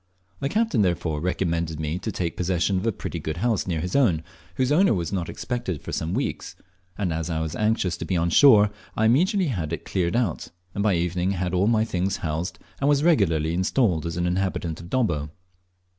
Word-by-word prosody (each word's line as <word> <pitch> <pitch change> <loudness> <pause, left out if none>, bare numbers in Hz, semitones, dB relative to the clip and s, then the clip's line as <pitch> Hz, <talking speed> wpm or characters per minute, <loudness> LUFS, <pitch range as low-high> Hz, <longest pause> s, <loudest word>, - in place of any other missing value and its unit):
The 135 - -1
captain, 215 - +1
therefore, 85 -5 0
recommended 85 -3 -1
me 80 +3 -2
to 110 - -4
take 85 -5 -3
possession 90 +1 0
of 95 +5 -1
a - - +3
pretty 85 -3 -5
good 80 +1 -4
house 110 0 0
near 85 -4 -1
his 90 +2 -3
own, 95 - +3 0.3
whose 130 +1 +1
owner 170 - +4
was 85 +1 -3
not 90 -4 -2
expected 120 - -3
for - - -6
some 80 +3 -2
weeks; - - -3 0.4
and 95 -5 -1
as 80 +1 -3
I 80 -2 -1
was 80 -1 -3
anxious 105 -5 0
to - - -5
be 90 - 0
on 85 +1 +1
shore, 105 - +7 0.3
I 110 - +3
immediately 180 - +3
had 85 - -3
it 85 - -4
cleared 90 0 -1
out, 115 -10 0 0.3
and 100 - -2
by 100 -2 +3
evening 90 +2 0
had 90 -1 -2
all 95 +3 +2
my 110 -1 +3
things 95 -2 -1
housed, 85 +3 -3 0.2
and 140 - +2
was 145 0 +3
regularly 85 - +3
installed 90 - +1
as 85 0 -4
an 85 - 0
inhabitant 90 -3 -1
of 85 0 -10
Dobbo. 85 - 0
90 Hz, 210 wpm, -24 LUFS, 85-110 Hz, 0.4 s, shore